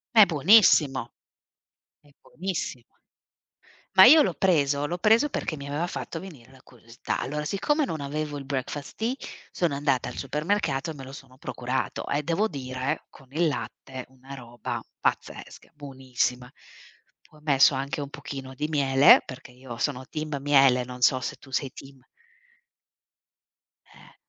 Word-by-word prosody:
È 215 -2 +9
buonissimo 155 - +4 0.9
è 145 - -23
buonissimo. 165 -9 -5 1.1
Ma 190 - +9
io 305 +7 +9
l'ho - - -1
preso 145 -6 +1
l'ho 175 +4 -4
preso 225 +9 +4
perché 155 - -3
mi 140 -1 -8
aveva 145 +4 -2
fatto 165 - -6
venire 140 -10 -12
la 130 - -18
curiosità. 115 +1 -6
Allora 150 +2 -3
siccome 295 - 0
non 160 - -4
avevo 145 +1 -4
il 140 - -8
Breakfast 135 +1 -5
Tea, 230 +3 -1 0.4
sono 170 -5 -1
andata 140 -3 0
al 125 - -8
supermercato 150 +1 -1
e - - -7
me 140 - -10
lo 135 - -10
sono 130 -2 -13
procurato 130 0 -4
e 145 - 0
devo 170 +8 0
dire 130 -4 -4
con 135 - -18
il 165 +2 +2
latte 130 0 -6
una 130 +1 -12
roba 120 -2 -6 0.2
pazzesca, - - -4
buonissima. 130 -3 -3 0.8
Ho 155 - -19
messo 140 -2 +4
anche 135 +2 -3
un 140 - -5
pochino 140 -2 -8
di 150 +4 -3
miele, 140 -2 +6
perché 130 -1 -10
io 125 -1 -10
sono 130 +1 -2
team 155 -2 -4
miele, 135 -3 +4
non 125 0 -9
so 130 +1 +4
se - - -5
tu 135 - -17
sei 135 +1 -2
team 135 -1 -13 1.9
Eh. - - -19
140 Hz, 155 wpm, -26 LUFS, 130-155 Hz, 1.9 s, È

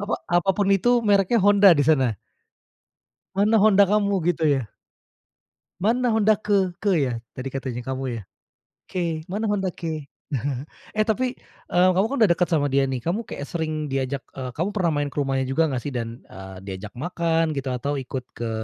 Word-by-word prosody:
Apa 205 - -1 0.2
apapun 195 +3 +2
itu 240 +5 +3
mereknya 200 +2 +3
Honda 200 0 +6
di 145 - +3
sana. 135 -8 +3 1.2
Mana 205 +3 +2
Honda 200 -2 +6
kamu 205 0 +2 0.2
gitu 160 - -4 0.2
ya? 115 - -6 1.1
Mana 240 +6 +1
Honda 220 -1 +4
ke 195 -4 +1
ke 200 -1 +1
ya? 135 -5 +1 0.2
Tadi 130 +1 -4
katanya 130 -2 -4
kamu 130 +1 -4 0.2
ya? - - -11 0.6
Ke, 165 -3 -3
Mana 215 +2 -1
Honda 195 -3 0
ke? 160 -3 -5 0.9
Eh, 215 0 +1
tapi, 250 +3 -1 0.3
eee, 180 +1 +4
kamu 195 +4 +3
kan 280 - -1
udah 215 -6 +5
deket 180 - 0
sama 150 -4 +2
dia 140 +1 +2
nih, 130 - -1
kayak 175 -6 -3
sering, 155 -2 -3
eee, 135 -1 -1
diajak 140 -2 -3 0.4
kamu 175 +4 +1
pernah 180 -5 +1
main 145 - 0
ke - - -14
rumahnya 135 -1 -1
juga 155 +4 +2
gak 130 - -1
sih? 145 - -4
Dan, 115 0 -4
eee, 95 0 -10
diajak 100 +2 -6
makan 165 0 0
gitu 135 -1 -2
atau 140 +4 -2
ikut 130 -1 -5
ke 115 -1 -3
170 Hz, 175 wpm, -24 LUFS, 135-200 Hz, 1.2 s, Honda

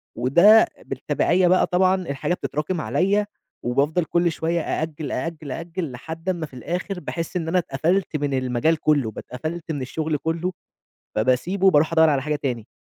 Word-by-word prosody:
وده 175 - +6 0.2
بالتبعية 180 +1 +1
بقى 185 +1 +4
طبعًا 185 +1 +3
الحاجة 175 -2 -2
بتتراكم 155 0 -2
عليَّ، 200 +3 +1 0.4
وبافضل 145 +7 +1
كُلّ 170 0 +1
شوية 165 +1 -1
أأجّل، 155 -3 -3
أأجّل، 155 0 -4
أأجّل 165 -1 -4
لحد 160 +8 -6
أمّا 170 -4 -1
في 140 - -17
الآخر، 180 - -4
باحس 165 +1 -5
إن 165 -2 -1
أنا 180 +3 +1
اتقفلت 165 +4 0
من 145 -1 -2
المجال 130 +5 +1
كُلّه، 145 -9 +2
ب - - -20
اتقفلت 160 +6 -5
من 145 -3 -3
الشغل 155 +3 -2
كُلّه، 165 +4 -2 0.6
فباسيبه 130 - +2
وبارُوح 160 -1 +4
أدوّر 160 -1 +6
على 140 -2 +1
حاجة 150 +1 -1
تاني. 120 -6 -3
160 Hz, 165 wpm, -23 LUFS, 140-175 Hz, 0.6 s, وده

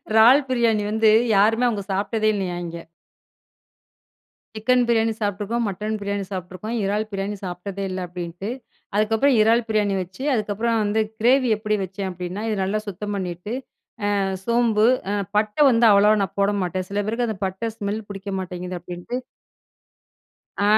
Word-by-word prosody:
இறால் 250 +6 +6
பிரியாணி 230 -4 +2
வந்து 220 0 +4 0.3
யாருமே 225 +5 +4
அவங்க 205 -4 -2
சாப்ட்டதே 215 +3 0
இல்லையாம், 180 -3 -3
இங்க. 170 0 -7 1.8
சிக்கன் 250 +3 +3
பிரியாணி 225 -1 +3
சாப்புட்டுருக்கோம். 210 +3 -1
மட்டன் 210 +3 -3
பிரியாணி 200 0 -2
சாப்புட்டுருக்கோம். 185 +4 -5
இறால் 210 +2 0
பிரியாணி 195 +1 -3
சாப்பிட்டதே 185 +2 -5
இல்ல 185 - -3
அப்படின்ட்டு. 175 +2 -6 0.5
அதுக்கப்புறம் 225 +6 +3
இறால் 230 +2 +4
பிரியாணி 210 -2 +1
வச்சு. 185 +7 -7
அதுக்கப்புறம் 225 +1 0
வந்து 210 +1 +1 0.2
கிரேவி 255 +2 +4
எப்டி 215 0 -1
வச்சேன் 190 +1 -5
அப்படின்னா, 180 +3 -5
இது 215 - 0
நல்லா 200 +3 0
சுத்தம் 205 +2 -4
பண்ணிட்டு 180 +2 -4 0.7
அ, - - +1 0.3
சோம்பு, 230 -2 +3 0.3
அ, - - 0 0.2
பட்டை 215 +6 +1
வந்து 230 0 +5
அவ்வளோவா 205 +1 +5
நான் 190 - -5
போட 200 +1 +3
மாட்டேன். 185 +1 -3
சில 205 - -1
பேருக்கு 230 +3 -1
அந்த 215 - -4
பட்ட 190 +5 -3
ஸ்மெல் 205 +1 -3
புடிக்க 195 0 -6
மாட்டேங்குது. 180 0 -5
அப்படின்ட்டு 175 +7 -5 1.4
ஆ, - - +2
210 Hz, 145 wpm, -23 LUFS, 190-225 Hz, 1.8 s, இறால்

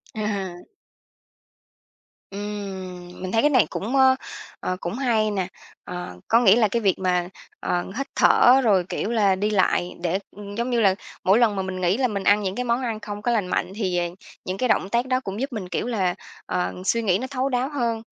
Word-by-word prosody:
À. 200 -4 -2 1.8
Ừm, 190 -3 -6
mình 185 0 -4
thấy 225 - +3
cái 295 - +4
này 255 -6 +4
cũng, 225 +7 -3
ờ, 265 -1 +6 0.4
ờ, 185 - -2
cũng 175 - -4
hay 230 -4 +1
nè! 190 -3 -1 0.4
Ờ, 180 - -7
có 230 - +5
nghĩa 220 -4 +6
là 230 -2 +4
cái 230 +3 -1
việc 195 -3 +2
mà, 180 -1 0 0.3
ờ, 175 0 -1
hít 275 - -2
thở 260 +2 +6
rồi, 200 -6 +4
kiểu 215 - -2
là, 205 -5 +3
đi 205 +3 0
lại 185 -3 +2
để, 175 +2 0 0.2
ừm, 205 0 -8
giống 235 +3 -1
như 240 -2 +2
là, 195 -3 +4 0.3
mỗi 195 +5 +5
lần 225 -4 +3
mà 190 - -1
mình 185 -1 -4
nghĩ 180 +5 +2
là 260 - +2
mình 200 -4 -3
ăn 205 +2 +4
những 190 -1 -2
cái 250 - -2
món 240 +1 0
ăn 230 -4 -2
không 205 -1 -6
có 240 - 0
lành 210 -6 +1
mạnh 180 - -1
thì, 185 -5 -1
ờ, 175 - +1 0.4
những 185 +1 -3
cái 250 +4 0
động 190 - +2
tác 235 +3 +1
đó 255 0 +2
cũng 200 -4 -6
giúp 275 0 -3
mình, 195 -5 -5
kiểu 230 - -2
là, 190 -7 0 0.3
ờ, 180 - -1
suy 230 +4 +2
nghĩ 190 -5 +2
nó 260 - -4
thấu 265 0 -1
đáo 255 +1 0
hơn. 235 -6 -1
210 Hz, 220 wpm, -24 LUFS, 185-235 Hz, 1.8 s, ờ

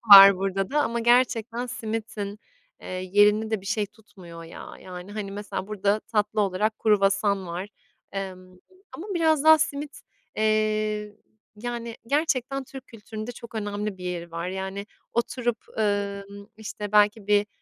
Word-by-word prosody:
var 195 -1 +12
burada 195 +1 -1
da 295 +2 +2
ama 235 0 -1
gerçekten 240 0 +2
simitin, 215 -3 -4 0.4
eee, - - -11 0.3
yerini 210 +2 +5
de 220 -3 0
bir 195 - -13
şey 210 +1 0
tutmuyor 185 -6 -13
ya. 165 - -10
Yani 180 +2 -9
hani 205 -2 -4
mesela 205 -1 -5
burada 205 0 +1
tatlı 215 -1 0
olarak 205 +2 0
kruvasan 200 -2 +2
var, 175 +4 -4 0.4
emm, 185 -2 -6 0.4
ama 360 - -7
biraz 315 -3 +3
daha 315 0 +9
simit, 290 -1 -2 0.4
eee, 215 -1 +1 0.4
yani 235 0 -5
gerçekten 275 -2 0
Türk 265 0 -10
kültüründe 220 +1 -7
çok 235 -1 -12
önemli 205 -2 -3
bir 180 - -9
yeri 175 -1 -4
var. 170 +1 -4
Yani 190 +2 -4 0.3
oturup, 240 -1 0 0.2
ımm, 200 -1 -2
işte 210 -1 -6
belki 210 0 +4
bir, 205 0 +4
210 Hz, 145 wpm, -26 LUFS, 195-230 Hz, 0.4 s, var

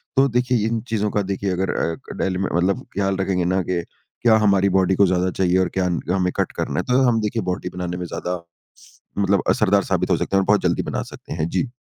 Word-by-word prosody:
तो 135 0 +5
देखिए 125 -3 +1
इन 115 0 -1
चीज़ों 105 -2 0
का 105 - +1
देखिए 100 0 -2
अगर 95 +1 -1
अ, 80 - -1
क - - -7
डेली 95 -1 -1
में 95 - -1
मतलब 90 +3 +1
ख़याल 95 -1 0
रखेंगे 95 -2 0
ना 95 +1 +1
कि 90 -2 0 0.4
क्या 115 -2 +5
हमारी 100 -1 +4
बॉडी 95 0 +3
को 100 - +5
ज़्यादा 90 0 +1
चाहिए 90 0 +1
और 95 -1 +2
क्या 95 - +2 0.3
हमें 90 -1 +1
कट - - 0
करना - - -1
है - - -1
तो 130 - +4
हम 115 -2 +2
देखिए 110 +2 -1
बॉडी 90 0 -4
बनाने 90 -1 -3
में 90 - -4
ज़्यादा 90 +1 -4 0.8
मतलब 100 -1 +2
असरदार 100 -2 +3
साबित 90 -1 0
हो 85 - +4
सकते 100 - -2
हैं 95 - +5
और - - -2
बहुत 105 0 +4
जल्दी - - +1
बना - - -2
सकते - - -9
हैं। 80 0 -1
जी। 135 - -1
95 Hz, 245 wpm, -22 LUFS, 90-105 Hz, 0.8 s, तो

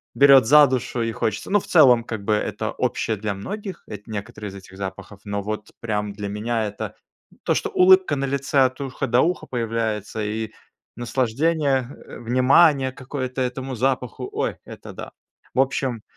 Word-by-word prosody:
берёт 135 -3 +7
за 150 +4 +8
душу 125 -1 -2
и 115 0 -1
хочется. 110 -1 -3
Ну, 205 +1 +4
в - - -11
целом, 125 -8 +6
как 110 -4 -5
бы 105 - +1
это - - -2
общее 110 - -1
для 105 0 -3
многих. 195 - -7
Это 105 -1 -8
некоторые 105 0 -6
из 95 - -11
этих 95 0 -13
запахов, 100 +1 -7
но 100 0 -2
вот 105 +1 -5
прям 105 -3 -2
для 100 0 -5
меня 110 +2 -1
это 105 - -6 0.5
то, - - +2
что - - -1
улыбка 185 -4 +5
на 140 0 -1
лице 140 +1 0
от 130 0 +2
уха 135 0 -3
до 125 +1 +3
уха 175 +2 0
появляется, 110 -3 -2
и 110 +1 -3 0.4
наслаждение, 135 +3 0 0.2
э, - - -10
внимание 130 +3 +4
какое-то 130 0 -5
этому 130 +1 -3
запаху, 125 0 -2
ой, - - -2
это - - -10
да. - - -8 0.4
В - - +1
общем 130 -4 -1
120 Hz, 175 wpm, -23 LUFS, 105-135 Hz, 0.5 s, за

